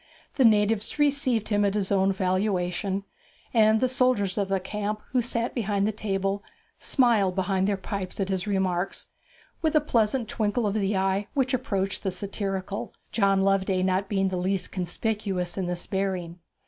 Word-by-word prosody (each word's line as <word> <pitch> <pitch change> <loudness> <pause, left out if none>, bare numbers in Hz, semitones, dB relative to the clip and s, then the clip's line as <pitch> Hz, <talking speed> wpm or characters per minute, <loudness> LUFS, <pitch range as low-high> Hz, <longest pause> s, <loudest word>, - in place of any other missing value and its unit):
The 265 - +3
natives 215 +1 +3
received 280 -7 +1
him 205 -1 +2
at 200 0 +1
his 200 -2 0
own 195 0 +3
valuation, 190 0 0 0.5
and 220 -1 +5
the 255 - +3
soldiers 250 -7 +1
of 200 -2 0
the 195 0 +1
camp, 210 +2 -3
who 250 -1 +2
sat 235 0 -1
beyond 205 -4 0
the 215 - +1
table, 195 -1 -2 0.4
smiled 225 -8 +3
behind 190 0 +1
their 205 -1 +1
pipes 190 -1 -5
at 195 -1 -1
his 190 0 -1
remarks, 190 -2 -1 0.5
with 315 -1 +1
a - - +7
pleasant 235 -4 +1
twinkle 215 0 0
of 205 - 0
the 205 -2 0
eye 195 +1 0
which 265 -1 +1
approached 200 -6 -1
the 195 - -1
satirical, 195 +1 -4 0.2
John 195 -3 +3
Loveday 190 -1 +2
being - - +2
not 190 +1 0
the 195 -2 0
least 190 +1 -1
conspicuous 185 -1 -2
in 190 -2 -2
this 175 0 -3
bearing. 185 -3 -2
200 Hz, 170 wpm, -26 LUFS, 190-215 Hz, 0.5 s, a